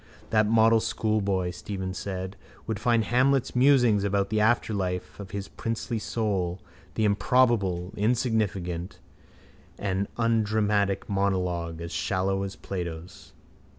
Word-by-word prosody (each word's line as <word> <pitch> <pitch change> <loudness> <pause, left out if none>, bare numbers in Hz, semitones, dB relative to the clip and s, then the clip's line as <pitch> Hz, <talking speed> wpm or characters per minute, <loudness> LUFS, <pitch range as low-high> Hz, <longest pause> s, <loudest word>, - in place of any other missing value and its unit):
—That 110 -1 +4
model 115 +1 +5
schoolboy, 100 -5 0
Stephen 95 +1 -5
said, 95 0 -5 0.3
would 110 -3 -3
find 115 -2 +2
Hamlet's 130 +3 +2
musings 125 -6 +4
about 100 -1 0
the 110 - +2
afterlife 95 -7 0
of 100 -2 -7
his 100 -1 -5
princely 115 0 -3
soul, 100 -6 -1 0.4
the 110 - +1
improbable, 100 -4 +2
insignificant 105 -6 -1 0.8
and 100 0 -1
undramatic 105 -3 +1
monologue, 90 -4 -1
as 85 0 -6
shallow 95 +4 0
as 100 0 -4
Plato's. 85 -2 -7
100 Hz, 115 wpm, -27 LUFS, 95-110 Hz, 0.8 s, model